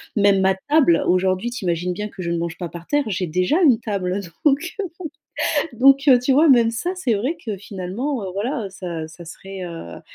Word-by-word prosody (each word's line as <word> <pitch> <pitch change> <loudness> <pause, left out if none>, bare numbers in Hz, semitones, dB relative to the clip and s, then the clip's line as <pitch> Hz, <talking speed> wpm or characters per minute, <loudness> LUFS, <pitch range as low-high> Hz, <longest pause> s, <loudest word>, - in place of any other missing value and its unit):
même 200 -2 +4
ma 190 0 +4 0.2
table 285 - +4
aujourd'hui 185 +5 +1
tu 240 -4 -6
imagines 175 +1 -1
bien 210 +3 -5
que 190 - -9
je 170 - -3
ne 170 - 0
mange 170 0 -3
pas 175 - -4
par 170 0 -10
terre. 290 0 +1
J'ai 190 -3 -1
déjà 180 - +1
une 255 -8 +5
table, 190 -4 -2
heu, 200 - -2 0.2
donc 295 +4 +2
heu, - - 0 0.9
bon. 230 - -14
Donc 275 +1 +6
heu, 260 -3 +7
tu 250 +2 +1
vois? 310 +3 +5
Même 235 -3 +5
ça, 235 +11 -2
c'est 265 -11 0
vrai 255 +11 -1
que 215 -3 -4
finalement, 205 +7 -4
heu, 185 - -4
voilà 225 +2 -2
heu, - - -6
ça 170 -4 -6
ça 170 +2 -12
serait, 190 +3 -8
heu, - - -5
à 125 - -9
200 Hz, 235 wpm, -21 LUFS, 180-255 Hz, 0.9 s, heu